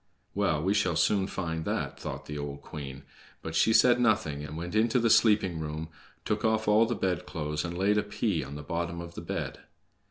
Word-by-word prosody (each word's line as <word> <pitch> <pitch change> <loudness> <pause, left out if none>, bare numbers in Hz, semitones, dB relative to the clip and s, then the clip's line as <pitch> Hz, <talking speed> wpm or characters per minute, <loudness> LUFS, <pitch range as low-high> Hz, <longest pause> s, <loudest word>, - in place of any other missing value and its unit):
"Well, 85 -7 +1
we 95 +3 +2
shall 95 -5 +1
soon 95 +3 +2
find 80 -5 -3
that!" - - -2
thought 70 0 -6
the 75 - -6
old 70 -1 -6
queen. 70 -2 -8 0.4
But 80 - -5
she 80 +7 +4
said 120 +2 +5
nothing 110 -11 +1
and 75 +1 -7
went 85 +1 -5
into 110 +3 +3
the 115 -2 +3
sleeping 105 -7 +4
room, 80 +1 -4 0.4
took - - -1
off 110 -1 +1
all 110 +2 +5
the 120 - -1
bedclothes, 75 -6 -2
and 85 0 -4
laid 100 +3 +3
a - - +2
pea - - -1
on 70 +1 -8
the 75 - -7
bottom 85 +2 -3
of 85 0 -7
the - - -7
bed. - - -4
85 Hz, 210 wpm, -29 LUFS, 75-105 Hz, 0.4 s, said